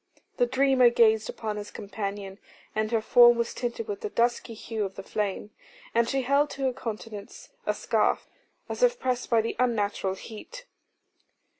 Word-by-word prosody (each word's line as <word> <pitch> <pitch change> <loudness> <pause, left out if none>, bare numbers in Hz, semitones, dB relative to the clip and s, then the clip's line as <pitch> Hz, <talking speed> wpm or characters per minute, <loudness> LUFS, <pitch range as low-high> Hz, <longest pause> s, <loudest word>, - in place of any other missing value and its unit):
The 245 - +3
dreamer 260 -1 +4
gazed 220 -2 +3
upon 215 -2 -4
his 205 0 -6
companion, 200 -1 -6 0.3
and 215 +1 -1
her 225 -2 +2
form 240 +1 +7
was 235 0 -1
tinted 250 - -4
with 415 -1 -4
the 430 - -3
dusky 235 - 0
hue 220 0 -4
of 195 -1 -5
the 195 - -7
flame, 205 0 -3 0.4
and 235 0 +2
she 270 -1 0
held 280 +3 +3
to 275 - -6
her 260 -1 +1
countenance 215 -3 -7 0.2
a - - +1
scarf, - - +1 0.4
as - - -5
if - - +4
pressed 250 -1 -1
by 230 -2 +4
the 225 - -3
unnatural 205 -5 0
heat. 355 - -10
230 Hz, 170 wpm, -27 LUFS, 210-255 Hz, 0.4 s, form